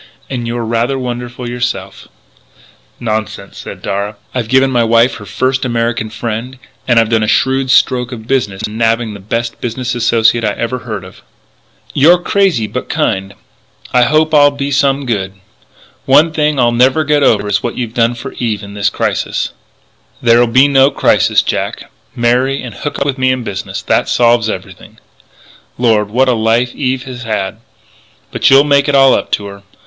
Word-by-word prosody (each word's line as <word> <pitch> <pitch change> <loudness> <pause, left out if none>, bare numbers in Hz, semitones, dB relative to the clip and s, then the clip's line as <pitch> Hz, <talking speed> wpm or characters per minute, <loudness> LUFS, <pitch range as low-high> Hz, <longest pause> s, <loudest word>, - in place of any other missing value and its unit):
And 120 -3 -3
you're 120 0 -3
rather 115 +4 0
wonderful 125 -1 -5
yourself 120 -6 -4 0.5
" - - -30
"Nonsense," 110 -2 -4
said - - -9
Darragh, 100 +2 -3 0.2
"I've 125 -3 -2
given 130 +2 +3
my 120 -2 +2
wife 115 +2 +3
her 105 - -11
first 130 +1 -1
American 115 -2 -1
friend 115 +3 -5 0.3
and 120 -2 +4
I've 115 -1 +1
done 110 -1 +2
a 110 - 0
shrewd 130 +3 +1
stroke 125 -1 +2
of 110 -3 -8
business 115 -7 -1
in 110 +2 -7
nabbing 115 -1 0
the 100 - -9
best 115 +4 -4
business 120 +1 -3
associate 115 -1 +2
I 105 -1 0
ever 115 +4 -3
heard 110 -5 -6
of 95 - -14 0.4
" - - -27
"You're 170 +5 +7
crazy 180 - +1
but - - -5
kind.... 95 +1 -1 0.6
I 125 - +4
hope 155 +5 +2
I'll 145 -1 +6
be 140 0 -4
some 140 0 +1
good.... 100 -6 -2 0.7
One 150 +5 +5
thing; 150 -2 0
I'll 120 -1 +3
never 130 +6 +3
get 150 -1 +1
over 105 -6 +2
what 120 - -4
you've 120 -3 -4
done 115 0 +1
for 120 - -7
Eve 110 -4 -2
in 100 0 -9
this 105 0 0
crisis - - -2 0.3
" - - -36
"There'll 120 0 +4
be 130 +4 +4
no 135 -1 +4
crisis, - - +2
Jack. - - -4 0.2
Marry, 125 +3 +1
and 120 -3 -7
hook 145 - -5
up 140 - -1
with 140 -1 -2
me 130 0 +2
in 130 -1 -2
business. 95 -4 -5
That - - 0
solves 120 -2 +3
everything.... - - -8 0.8
Lord! 110 -4 +2
what 130 +5 +2
a 125 - +3
life 115 +2 +1
Eve 130 -2 -2
has 130 -2 -8
had! 110 -4 -3 0.7
But - - +2
you'll 135 +1 +7
make 140 0 +2
it 140 - +2
all 135 -1 +6
up - - -1
to 105 - 0
her 100 0 -10
120 Hz, 185 wpm, -14 LUFS, 110-130 Hz, 0.8 s, You're